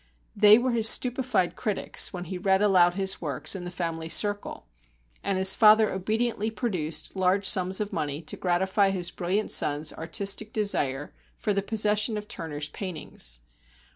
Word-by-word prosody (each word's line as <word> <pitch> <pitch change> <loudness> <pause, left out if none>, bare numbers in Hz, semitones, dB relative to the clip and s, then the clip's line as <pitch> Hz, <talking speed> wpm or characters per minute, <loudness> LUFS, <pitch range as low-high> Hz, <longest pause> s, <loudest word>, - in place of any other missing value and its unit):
They 210 +1 +7
were 250 +1 -1
his 225 -2 +4
stupefied 250 -7 +2
critics, 210 -5 0
when 180 -2 -6
he 180 +1 -7
read 190 0 +2
aloud 180 -3 +3
his 190 -1 -2
works 145 +2 0
in 180 -2 -7
the - - -5
family 165 -2 -5
circle, 205 +3 0 0.6
and 195 -1 -1
his 190 0 +5
father 215 0 +5
obediently 220 +3 -2
produced 185 -10 -3
large 190 +1 +1
sums 185 0 +3
of 210 0 -4
money 145 -3 -3
to - - -5
gratify 190 +3 0
his 180 -3 -1
brilliant 190 +5 -2
son's 150 +1 0
artistic 200 +6 -1
desire 145 -10 -2 0.2
for 210 - -2
the 200 - 0
possession 210 +1 0
of 210 0 -7
Turner's 150 -5 -6
paintings. 150 - -6
190 Hz, 160 wpm, -26 LUFS, 175-210 Hz, 0.6 s, They